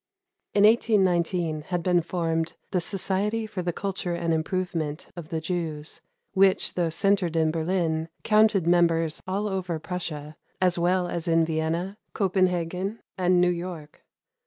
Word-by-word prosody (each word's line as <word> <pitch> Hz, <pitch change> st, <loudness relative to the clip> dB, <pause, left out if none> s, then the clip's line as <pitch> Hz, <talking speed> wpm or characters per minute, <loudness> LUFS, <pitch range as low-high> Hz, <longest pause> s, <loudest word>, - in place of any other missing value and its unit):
In 205 Hz, -, +5 dB
1819 180 Hz, -7 st, +3 dB
had 175 Hz, -2 st, -1 dB
been 180 Hz, -1 st, +3 dB
formed 165 Hz, -1 st, -1 dB, 0.2 s
the 185 Hz, -3 st, +1 dB
"Society 205 Hz, +4 st, -1 dB
for 210 Hz, -3 st, -4 dB
the 175 Hz, 0 st, -1 dB
Culture 185 Hz, -1 st, -3 dB
and 170 Hz, -1 st, 0 dB
Improvement 160 Hz, -2 st, -2 dB
of 170 Hz, -3 st, -8 dB
the 160 Hz, -, -2 dB
Jews," 160 Hz, -2 st, -3 dB, 0.3 s
which, 195 Hz, -1 st, +3 dB
though 175 Hz, -2 st, 0 dB
centered 180 Hz, 0 st, +1 dB
in 160 Hz, -1 st, +3 dB
Berlin, 165 Hz, -1 st, -1 dB
counted 215 Hz, -4 st, +4 dB
members 165 Hz, -2 st, +2 dB
all 200 Hz, +3 st, -1 dB
over 185 Hz, -4 st, -2 dB
Prussia, 155 Hz, -3 st, -6 dB, 0.2 s
as 180 Hz, -2 st, +2 dB
well 180 Hz, +1 st, +2 dB
as 175 Hz, 0 st, -3 dB
in 165 Hz, -1 st, +4 dB
Vienna, 165 Hz, +5 st, -2 dB
Copenhagen, 185 Hz, +1 st, 0 dB
and 180 Hz, -1 st, +3 dB
New 180 Hz, 0 st, +4 dB
York. 170 Hz, -4 st, -6 dB
175 Hz, 140 wpm, -26 LUFS, 165-190 Hz, 0.3 s, In